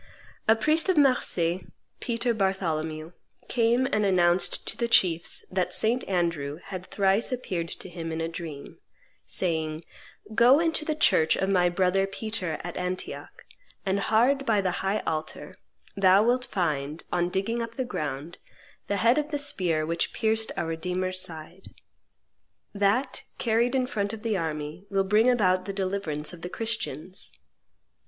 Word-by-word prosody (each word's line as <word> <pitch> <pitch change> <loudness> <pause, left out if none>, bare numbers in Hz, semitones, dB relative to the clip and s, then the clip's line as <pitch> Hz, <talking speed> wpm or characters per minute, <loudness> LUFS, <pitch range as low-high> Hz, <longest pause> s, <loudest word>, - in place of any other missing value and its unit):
A 220 - +6
priest 310 - +2
of 370 - +3
Marseilles, 190 - +2 0.4
Peter 235 0 0
Bartholomew, 165 -6 -1 0.4
came 240 +1 +2
and 215 -6 +1
announced 180 -2 +3
to - - -1
the 235 - -1
chiefs 170 -7 +2
that 185 -1 0
St. 235 +3 +1
Andrew 170 -6 -1
had 185 +1 -8
thrice 195 +4 +2
appeared 185 -9 -3
to - - -7
him 165 -2 -6
in 160 - -3
a 165 - -1
dream, 165 -4 -8 0.5
saying, 160 -3 -2 0.5
"Go 245 +6 +6
into 325 -2 0
the 310 - -1
church 160 - +4
of 190 - -1
my 180 -2 +3
brother 185 +2 +2
Peter 195 -5 -3
at 175 0 -6
Antioch; 180 0 -5 0.4
and 195 +1 +1
hard 245 +7 +3
by 225 -6 +2
the 190 -2 +1
high 195 +2 0
altar 155 +3 -4 0.4
thou 195 +1 +5
wilt 250 +2 +2
find, 155 - -2
on 175 0 +1
digging 195 +6 -1
up 230 0 -5
the 260 - -2
ground, 150 - -5 0.5
the 200 - 0
head 235 +8 +4
of 300 0 -3
the 295 - -1
spear 185 - 0
which 165 +1 -1
pierced 220 0 +1
our - - -1
Redeemer's 180 +3 -2
side. 170 +1 -9 1.0
That, 205 +6 +1
carried 235 +2 +1
in 255 -1 +2
front 205 -5 -2
of 220 - -8
the 225 -2 0
army, 155 0 -4
will 195 -1 +2
bring 210 +5 +4
about 185 -6 +2
the 195 - -4
deliverance 185 -6 -2
of 170 - -11
the 180 - -5
Christians." 195 -7 -3
190 Hz, 155 wpm, -27 LUFS, 170-230 Hz, 1.0 s, A